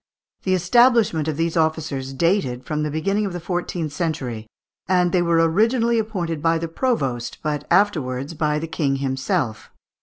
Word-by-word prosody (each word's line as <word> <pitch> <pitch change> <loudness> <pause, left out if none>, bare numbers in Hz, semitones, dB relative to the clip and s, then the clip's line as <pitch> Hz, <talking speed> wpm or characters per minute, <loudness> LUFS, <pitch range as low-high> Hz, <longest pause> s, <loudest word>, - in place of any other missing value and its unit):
The 185 -1 +1
establishment 215 - +3
of 155 -2 -2
these 165 0 0
officers 155 -4 -1
dated 135 -5 0
from 150 -1 -2
the 150 - -1
beginning 195 +7 0
of 190 - -6
the 175 - -4
fourteenth 175 -3 -3
century, 130 -11 -3 0.4
and 180 -1 +2
they 180 - +2
were 165 -1 +3
originally 230 +6 +2
appointed 175 -8 -3
by 165 +1 +2
the 165 +1 -3
provost, 140 - -1
but 150 -1 -2
afterwards 155 -7 +1
by 150 -1 0
the 155 - -3
King 145 -4 0
himself. 135 - -2
165 Hz, 160 wpm, -22 LUFS, 145-185 Hz, 0.4 s, establishment